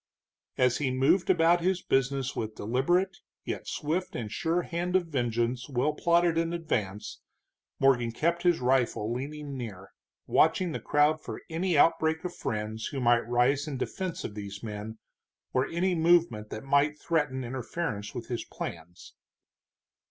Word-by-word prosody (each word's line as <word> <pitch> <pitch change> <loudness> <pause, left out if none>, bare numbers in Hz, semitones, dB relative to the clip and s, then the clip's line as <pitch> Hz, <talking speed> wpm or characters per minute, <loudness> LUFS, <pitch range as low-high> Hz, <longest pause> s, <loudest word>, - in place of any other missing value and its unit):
As 125 -1 +3
he 140 -3 0
moved 135 +8 +2
about 170 -1 +4
his 185 +1 0
business 135 0 0
with 110 -1 -4
deliberate, 175 - +1 0.3
yet - - -4
swift 165 +5 -2
and 110 -4 -4
sure 170 +2 0
hand 175 +2 -2
of 185 -2 +3
vengeance 120 -3 -1
well 140 +3 +1
plotted 170 +1 +3
in 165 0 -1
advance, 110 - -3 0.6
Morgan 125 -4 +3
kept 170 +8 0
his 175 -4 +2
rifle 125 -3 +1
leaning 145 +2 -5
near, 100 -7 -7 0.3
watching 180 -3 +3
the - - -3
crowd 150 +1 +2
for - - -7
any 170 0 +1
outbreak 160 +1 +3
of 180 - -4
friends 110 0 -3
who 140 - -4
might 120 -2 +3
rise 125 +4 +2
in 140 -3 -3
defense 185 +6 -4
of - - -5
these 100 0 -7
men, 110 0 -6 0.6
or 130 +1 +2
any 180 +2 0
movement 165 -10 +3
that 110 - -6
might 140 +2 +2
threaten 150 -6 0
interference 120 -3 -4
with 115 - -5
his 120 -2 -3
plans. 85 +1 -8
135 Hz, 150 wpm, -29 LUFS, 120-165 Hz, 0.6 s, about